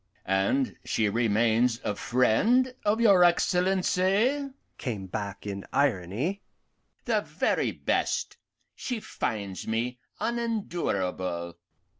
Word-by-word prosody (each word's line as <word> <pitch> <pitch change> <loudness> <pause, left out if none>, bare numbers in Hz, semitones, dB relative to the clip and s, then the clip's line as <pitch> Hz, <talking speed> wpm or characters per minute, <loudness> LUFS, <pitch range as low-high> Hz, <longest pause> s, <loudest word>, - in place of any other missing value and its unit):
And 95 - +1
she 110 -2 +1
remains 115 +2 +2
a 105 - -1
friend 210 - +2
of 210 +2 +2
your 200 -6 +6
Excellency?" 190 +9 +2 0.3
came 110 -7 -4
back 100 +1 -5
in 100 -1 -4
irony. 130 - 0 0.6
"The - - +2
very - - 0
best; - - -1 0.4
she 245 -3 -4
finds 100 - -4
me 120 +3 -2 0.2
unendurable." 100 - -2
125 Hz, 95 wpm, -27 LUFS, -, 0.6 s, your